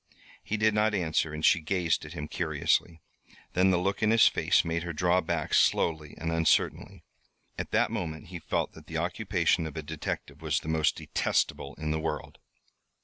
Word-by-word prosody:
He 110 - -2
did 110 0 +3
not 105 0 +2
answer, 80 -4 0
and 75 0 -2
she 90 - +5
gazed 85 0 0
at - - -9
him 75 - -5
curiously. 80 +1 0 0.5
Then 95 +1 +4
the 90 - +3
look 95 +4 -1
in 110 - +3
his 115 0 +6
face - - +3
made 85 0 -1
her 85 0 -4
draw 90 +3 +2
back, 80 -2 -2
slowly 80 -2 +2
and 80 0 -3
uncertainly. 80 -1 +1 0.5
At - - -5
that - - +2
moment 80 +1 -4
he 90 -2 -6
felt - - -2
that - - -14
the - - -4
occupation 80 - 0
of 80 - -9
a 80 - -4
detective 80 0 -5
was - - 0
the - - -11
most 80 -1 +2
detestable 70 - -1
in 75 -1 -3
the 80 - 0
world. 80 - -4
80 Hz, 190 wpm, -28 LUFS, 80-90 Hz, 0.5 s, his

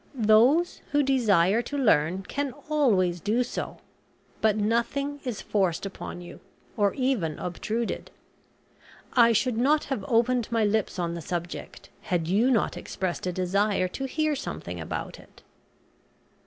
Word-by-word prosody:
Those 245 +9 +4
who 290 0 +4
desire 220 -6 +3
to 285 +4 -5
learn 185 - +2
can 280 +5 -3 0.2
always 195 -13 +2
do 220 +7 +1
so, 245 - -5 0.6
but 215 -1 +3
nothing 235 +7 0
is 240 -5 -4
forced 190 -4 0
upon 195 -2 -7
you, 175 - -11 0.4
or 205 -2 +1
even 255 - 0
obtruded. 220 +6 -3 1.0
I 235 -2 +6
should 230 +1 +1
not 295 +5 +3
have 265 -8 -3
opened 240 0 +2
my 225 -2 +2
lips 210 -1 0
on 170 -1 -1
the 170 - -5
subject 175 +2 -6
had 170 -3 -1
you 210 +8 +3
not 235 -5 +1
expressed 185 -1 -4
a - - 0
desire 185 +2 +1
to 270 +8 -4
hear 310 +3 0
something 275 - -6
about - - -5
it." - - -19
220 Hz, 140 wpm, -26 LUFS, 185-255 Hz, 1.0 s, I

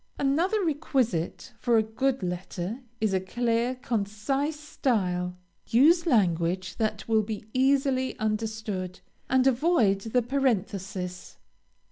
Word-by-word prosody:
Another 345 +9 +1
requisite 265 - -1
for 235 -2 +3
a 220 - +4
good 250 +2 -1
letter 180 +4 -4 0.2
is 215 -3 +1
a 190 - +3
clear, 235 +5 0
concise 250 +6 -2
style. 180 -11 -1 0.3
Use 330 +9 +5
language 185 - +1
that 215 -3 -2
will 220 -1 +3
be 215 0 -5
easily 265 0 +2
understood, 215 -4 -3 0.3
and 260 0 +3
avoid 250 - +3
the 230 +3 0
parenthesis. 195 -8 -2
225 Hz, 110 wpm, -27 LUFS, 195-265 Hz, 0.3 s, Use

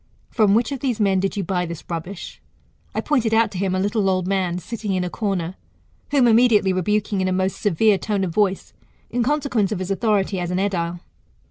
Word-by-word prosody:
From 210 -3 +3
which 230 +2 +1
of 275 - -3
these 245 -4 -1
men 195 -2 +3
did 195 +2 -2
you 200 - 0
buy 180 0 -1
this 170 -1 -7
rubbish? 175 +3 -6 0.5
I - - 0
pointed 235 -7 +1
out 230 0 +3
to 185 - -5
him 190 -1 0
a - - 0
little 205 0 +1
old 185 -1 0
man 185 -3 0
sitting 205 +3 -4
in 185 - 0
a 180 - -4
corner, 190 -5 -2 0.6
whom 275 -4 +4
immediately 225 -4 +4
rebuking 205 +2 0
in 185 - 0
a - - 0
most 185 +1 -1
severe 205 +1 +3
tone 205 -3 -1
of 175 -3 -2
voice, 195 -1 0 0.4
in 245 - 0
consequence 250 -6 0
of 210 - -1
his 185 +1 -4
authority 195 -1 +1
as 175 -1 -3
an 180 - -1
edile. 175 -3 -1
195 Hz, 215 wpm, -22 LUFS, 185-220 Hz, 0.6 s, whom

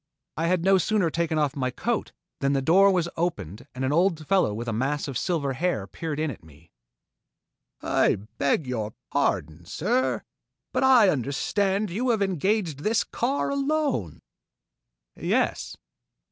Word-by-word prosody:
I 165 +1 -1
had 180 -1 +1
no 190 0 +5
sooner 185 -2 +1
taken 165 -1 -1
off 150 -1 +1
my 130 -2 -1
coat 230 - -2 0.3
than 140 0 +1
the 135 - +1
door 190 +7 +6
was 180 -3 +1
opened 130 - -3
and 130 +1 -2
an 135 - 0
old 165 -2 +2
fellow 190 - +3
with 115 +3 -5
a 115 - -1
mass 135 +7 -1
of 135 - -5
silver 140 -1 -1
hair 160 - -1
peered 150 - -5
in 155 -1 0
at 105 - -11
me. 80 +1 -19 1.1
"I - - +3 0.2
beg 140 +2 +1
your 110 -4 -4 0.2
pardon, 80 +3 -1
sir, 250 - 0 0.5
but - - +1
I 250 -6 +6
understand 190 - 0
you 245 +8 -1
have 220 -4 +2
engaged 190 -3 0
this 215 +8 +1
car 270 +4 -1
alone?" 280 - -1 0.9
"Yes." - - -1
165 Hz, 155 wpm, -26 LUFS, 130-195 Hz, 1.1 s, door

